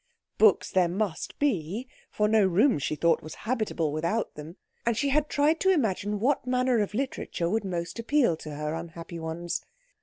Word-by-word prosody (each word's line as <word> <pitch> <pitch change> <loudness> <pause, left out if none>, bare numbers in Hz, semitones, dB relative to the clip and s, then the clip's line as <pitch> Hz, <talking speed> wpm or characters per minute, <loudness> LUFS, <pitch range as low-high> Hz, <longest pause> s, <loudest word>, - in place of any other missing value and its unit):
Books 215 -3 +5
there 185 -2 +3
must 185 0 -3
be, 220 - -1 0.2
for 210 - +1
no 215 -1 +4
room, 195 - +3
she 140 - -1
thought, 165 +1 +2
was 155 - -9
habitable 215 - 0
without 170 +9 -1
them; 155 +5 -10 0.3
and 235 -2 0
she 280 - +1
had 300 +2 +2
tried 300 +3 +2
to 380 - +2
imagine 210 - +1
what 255 +3 +1
manner 250 -1 +2
of 210 0 -1
literature 250 -9 -2
would 220 +1 0
most 175 +2 -4
appeal 240 - +2
to 155 -2 -8
her 150 +1 -3
unhappy 165 +1 -7
ones. 165 +2 -4
205 Hz, 180 wpm, -27 LUFS, 170-250 Hz, 0.3 s, Books